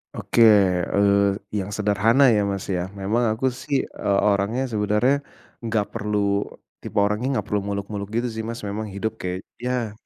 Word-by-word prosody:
Oke, 120 - 0 0.5
eee, 100 0 +3 0.2
yang 100 -2 -2
sederhana 110 +6 +4
ya, 105 -2 +2
Mas, 100 -1 -3
ya, 90 0 -1
memang 110 +5 0
aku 120 +4 0
sih, 135 +2 -2
eee, 100 -1 -1
orangnya 105 +6 +1
sebenarnya 105 +6 +2 0.4
nggak 110 -3 -1
perlu 105 -2 0 0.3
tipe - - -9
orangnya 105 +5 0
nggak - - -6
perlu 105 - +1
muluk-muluk 100 0 -4
gitu 120 +1 0
sih, 110 - -6
Mas. 115 -1 -6
Memang 105 +2 -4
hidup 110 +3 -4
kayak 90 +1 -4 0.2
ya, 125 -2 -2
105 Hz, 160 wpm, -23 LUFS, 100-115 Hz, 0.5 s, sederhana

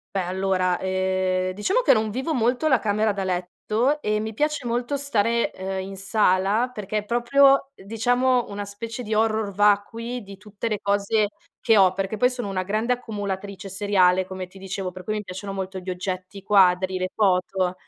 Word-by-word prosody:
Beh 195 - +2
allora 185 0 0
eh 185 0 0
diciamo 380 - +1
che - - +5
non 220 -1 +1
vivo 265 +8 -2
molto 245 +4 +1
la 260 -5 +4
camera 215 0 +1
da 195 -1 -3
letto 210 +10 -1
e 210 -4 0
mi 220 0 -4
piace 300 +2 -1
molto 240 +4 -1
stare, 235 -4 +1
ehm, 190 0 -4
in 195 0 -8
sala 200 +3 +2
perché 210 -1 -4
è 210 - -8
proprio 270 +4 +4
diciamo 245 +4 +1
una 205 0 -5
specie 230 +4 -6
di 215 0 -3
horror 220 -1 +1
vacui 210 +4 +1
di 195 0 -11
tutte 210 +2 -5
le 210 -2 -1
cose 205 +1 +1 0.3
che 225 -3 +4
ho, 190 -2 +6
perché 195 +2 -2
poi 250 +4 +3
sono 250 -4 -5
una 190 -2 -2
grande 215 +5 0
accumulatrice 200 -4 -5
seriale 190 -2 +2
come 185 0 -6
ti 185 - -16
dicevo, 190 -1 -5
per 185 0 -10
cui 215 +4 -2
mi 210 - -3
piacciono 190 +2 -7
molto 190 -1 -4
gli 185 0 -8
oggetti, 185 +1 -4
i 195 - -10
quadri, 185 -2 +4
le 185 0 -2
foto. 185 -2 +1
205 Hz, 190 wpm, -24 LUFS, 190-230 Hz, 0.3 s, ho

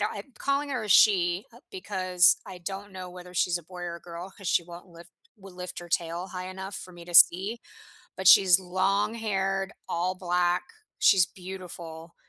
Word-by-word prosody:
don't 210 - -1
I'm 210 +6 -9
calling 280 +1 -1
her 255 -4 -2
a - - -7
she, 185 -2 +4
uh, 235 - -16
because 185 - +2
I 180 - -9
don't 195 +3 -7
know 185 -1 -7
whether 180 0 -12
she's 175 0 +1
a 175 - -13
boy 180 +2 -10
or 170 -1 -5
a - - -14
girl 170 +2 -9
'cause 195 -4 -6
she 170 - +2
won't 175 +1 -11
lift 170 0 -15 0.3
will 195 -1 -13
lift 180 0 -7
her 175 - -11
tail 170 +2 -2
high 185 0 -6
enough 190 +1 -7
for 185 - -8
me 170 -1 -12
to 175 - -10
see, 195 +8 +6 0.6
but 190 - -1
she's 185 -1 +7
long-haired, 195 +1 -1 0.2
all 180 +2 -1
black, 180 -1 0 0.4
she's 190 -4 +5
beautiful. 175 -3 -10
185 Hz, 190 wpm, -27 LUFS, 175-195 Hz, 0.6 s, she's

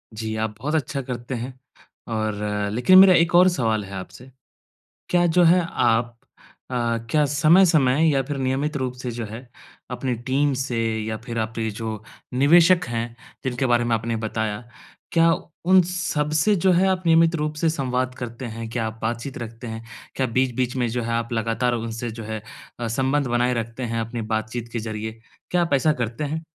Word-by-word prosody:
जी 110 0 -4
आप 110 -1 -2
बहुत 150 +6 -2
अच्छा 140 -2 -1
करते 125 0 -5
हैं 125 +3 -5 0.6
और 110 -1 -1 0.4
लेकिन 125 +11 +5
मेरा 190 -1 +9
1 170 0 +3
और 180 +1 +7
सवाल 110 -10 0
है 95 - -11
आपसे। 120 +7 -9 0.8
क्या 175 -1 +3
जो 175 - +7
है 175 +2 +5
आप 120 0 +2 0.6
अ, - - -4 0.4
क्या 150 -1 +4
समय-समय 155 -3 +4
या 135 - +2
फ़िर 145 +1 -4
नियमित 135 +3 -1
रूप 130 -2 -2
से 125 - -4
जो 115 0 -5
है 110 +3 -8 0.5
अपनी 130 -2 -2 0.2
टीम 140 +1 +2
से 125 -3 -3 0.3
या 110 0 -3
फ़िर 115 -2 -3
आपके 110 0 -2
जो 110 0 -5 0.3
निवेशक 170 +6 +5
हैं 115 0 -1 0.4
जिनके 130 0 -1
बारे 120 -1 +3
में 120 -1 0
आपने 115 +1 -2
बताया, 110 -1 -2 0.5
क्या 165 0 +4 0.3
उन 185 +1 +6
सबसे 155 +2 +1
जो 190 - +6
है 180 +2 +4
आप 185 -1 0
नियमित 165 0 +4
रूप 150 -1 -2
से 165 +1 +1
संवाद 130 -4 -1
करते 120 +1 -6
हैं? 115 -1 -6
क्या 115 -1 -2
आप 110 0 -8
बातचीत 120 +4 -3
रखते 115 0 -7
हैं? 110 0 -7 0.3
क्या 130 - +1
बीच-बीच 125 +1 0
में 125 -2 0
जो 120 +2 -2
है 115 - -3
आप 115 +1 -2
लगातार 115 +2 0
उनसे 115 0 -4
जो 115 0 -8
है 110 0 -5 0.4
अ, 120 - -2
संबंध 135 +4 0
बनाए 120 +1 +1
रखते 115 +3 -7
हैं 115 - 0
अपनी 115 +1 -4
बातचीत 110 +2 -4
के 115 - -1
ज़रिए? 110 0 -5 0.3
क्या 180 -1 +3
आप 165 -4 0
ऐसा 150 +3 +3
करते 115 +6 -4
हैं? 160 +3 -3
125 Hz, 185 wpm, -23 LUFS, 115-150 Hz, 0.8 s, मेरा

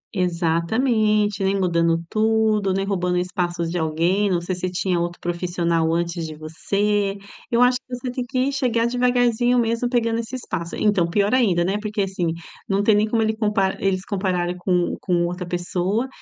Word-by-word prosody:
Exatamente, 205 +5 +1
nem 195 +1 +1
mudando 170 -2 +2
tudo, 215 -2 +2
nem 195 +1 0
roubando 180 -2 0
espaço 180 -1 -2
de 175 +1 -2
alguém, 170 +6 +1
não 175 -2 +1
sei 185 +2 -3
se 180 0 -3
tinha 180 -1 -1
outro 175 0 -3
profissional 170 -2 0
antes 170 -1 -1
de 155 - -8
você. 200 +6 -1 0.3
Eu 235 +1 +4
acho 250 0 +3
que 250 -1 -7
você 250 0 -5
tem 250 0 -3
que 260 +2 -1
chegar 240 -4 +1
devagarzinho 245 0 +2
mesmo, 235 +1 +1
pegando 230 -2 +1
esse 235 +3 -5
espaço 170 -8 -5
então, 195 -5 +2
pior 205 +4 +1
ainda, 195 -10 +3
né, 195 +3 0
porque, 210 -1 -2
assim, 190 -3 -2 0.4
não 195 +1 +1
tem 215 - +4
nem 210 +1 +3
como 225 -1 +1
ele 220 0 0
comp 215 -1 -1 0.2
eles 190 -1 0
compararem 180 -3 -1
com 180 -1 0
com 175 -2 +1
outra 180 +1 -4
pessoa, 180 +6 -1
195 Hz, 180 wpm, -22 LUFS, 175-225 Hz, 0.4 s, Eu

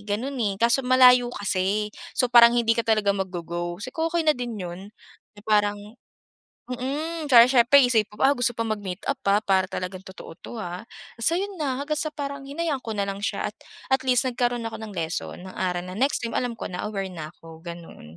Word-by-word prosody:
ganun, 250 +6 -2
eh, 200 -3 0
kaso 235 +4 +3
malayo 250 -1 +6
kasi, 205 +1 -1 0.2
so 250 -2 +2
parang 235 0 +8
hindi 230 -1 +3
ka 230 - 0
talaga 215 -3 +3
mag-go 185 -3 -4
go, 175 +1 -4
sabi 255 - -6
ko, 325 0 -1
"Okey 335 -1 -1
na 305 - +5
din 245 -4 -5
'yun 180 -2 -6 0.6
eh 205 - -14
parang" 205 -1 +2 0.9
mm. 295 +5 -4
Tsaka 235 -1 +9
siyempre 255 +1 +5
isipin 225 -5 +1
mo, - - -3
"Ah, 280 - +4
gusto 245 -2 +3
pa 230 0 -2
mag-meet-up, 205 +4 -3
ah, 205 - +5
para 190 -2 +2
talagang 185 0 -5
totoo 190 -3 -11
'to, 235 - -9
ah." 180 -2 -5 0.3
Basta 325 +9 +1
'yun 400 +1 -4
na 270 -4 -1
hanggang 305 +1 -2
sa 310 -1 -1
parang 280 -2 -5
hinayaan 285 0 -3
ko 225 - -6
na 200 -1 -1
lang 195 0 -4
siya - - -2
at, - - -27 0.4
at 265 0 +2
least 255 0 +2
nagkaroon 245 -2 -1
ako 225 - -6
ng 220 - -7
lesson, 165 +1 -4
ng 185 - -10
aral 180 -1 -2
na 185 - -7
next 270 +1 +1
time 230 - -6
alam 245 -2 -2
ko - - -5
na 180 - -5
aware 200 -2 -3
na 155 -4 -7
ko, 165 -1 -13
ganun. 170 -1 -10
230 Hz, 215 wpm, -25 LUFS, 190-260 Hz, 0.9 s, Tsaka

